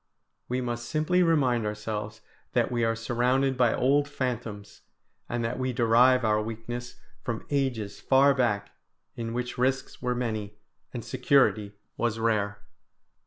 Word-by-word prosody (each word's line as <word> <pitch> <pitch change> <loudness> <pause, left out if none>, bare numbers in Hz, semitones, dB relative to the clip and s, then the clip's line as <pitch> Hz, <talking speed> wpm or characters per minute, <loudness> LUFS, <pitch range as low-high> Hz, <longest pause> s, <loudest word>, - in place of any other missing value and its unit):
We 125 +1 0
must 120 -1 -4
simply 155 +4 +2
remind 135 -9 +3
ourselves 105 0 -4 0.3
that - - +1
we 120 -1 0
are 115 0 +2
surrounded 125 +4 +1
by 125 -3 +3
old 140 +3 +2
phantoms, 120 -7 -4 0.5
and 120 -1 -1
that 120 +3 -3
we 130 0 -1
derive 120 +1 +4
our 105 0 +2
weakness 115 +2 -6 0.3
from 115 -2 -4
ages 125 -8 -1
far 140 +1 +4
back, 110 -6 0 0.4
in 115 -1 -4
which 125 +1 -4
risks 130 +1 -1
were 125 -1 0
many 110 -4 -3 0.4
and 120 -3 -6
security 125 -5 +2 0.2
was 115 -2 0
rare. 105 -3 0
120 Hz, 140 wpm, -27 LUFS, 110-130 Hz, 0.5 s, derive